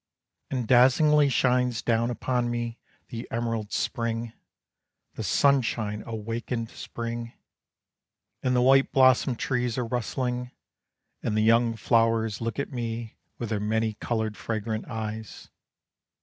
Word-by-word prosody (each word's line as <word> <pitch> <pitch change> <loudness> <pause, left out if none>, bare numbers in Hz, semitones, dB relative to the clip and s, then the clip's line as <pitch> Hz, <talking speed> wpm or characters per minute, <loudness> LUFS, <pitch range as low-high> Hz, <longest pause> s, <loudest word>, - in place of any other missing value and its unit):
And 125 -4 -2
dazzlingly 140 +4 +5
shines 125 -2 +2
down 115 0 +1
upon 125 0 -1
me 120 0 -3 0.3
The 115 -1 -6
emerald 115 -2 -2
spring, 115 0 -2 0.8
the - - -6
sunshine 115 -6 +2
awakened 115 +1 -4
spring, 115 0 -6 1.1
And 125 -1 +1
the 125 - +3
white 135 +1 +5
blossomed 130 -1 +4
trees 125 -1 -1
are 125 - 0
rustling; 125 +1 -2 0.7
And 110 - -1
the 110 - +3
young 115 +1 +4
flowers 115 -1 +1
look 115 -1 -3
at 140 - -3
me, 115 -2 -4 0.2
With 120 - -4
their 110 -2 -1
many 110 +1 0
colored, 110 -1 -2
fragrant 110 -1 -3
eyes. 110 -2 -6
115 Hz, 120 wpm, -27 LUFS, 110-125 Hz, 1.1 s, dazzlingly